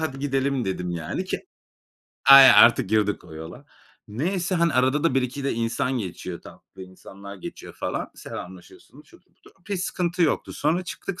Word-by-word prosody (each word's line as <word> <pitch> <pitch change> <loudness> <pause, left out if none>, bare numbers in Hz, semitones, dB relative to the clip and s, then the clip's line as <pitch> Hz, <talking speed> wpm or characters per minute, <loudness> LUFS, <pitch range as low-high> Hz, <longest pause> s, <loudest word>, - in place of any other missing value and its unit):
"Hadi 145 -4 -4
gidelim." 135 -2 -1
dedim, 90 -2 -3
yani, 85 -3 -4
ki - - -5 0.8
aynen 135 -1 +10
artık 115 -4 +6
girdik 105 -1 0
o 80 - -13
yola. 80 +1 -10 0.4
Neyse, 175 - -2
hani, 170 -2 +2
arada 130 +4 +1
da 165 - +2
1-2 135 +1 -2
de 140 - 0
insan 115 +3 -2
geçiyor. 90 -3 -6
Tatlı - - -14
insanlar 100 +2 -12
geçiyor 95 - -10
falan. - - -4
Selamlaşıyorsun, 90 0 -11
şudur - - -22
budur. - - -21
Okay, 200 +2 -5
sıkıntı 175 -1 -2
yoktu. 160 - 0
Sonra 165 +5 -1
çıktık 190 +2 -7
130 Hz, 160 wpm, -24 LUFS, 100-160 Hz, 0.8 s, aynen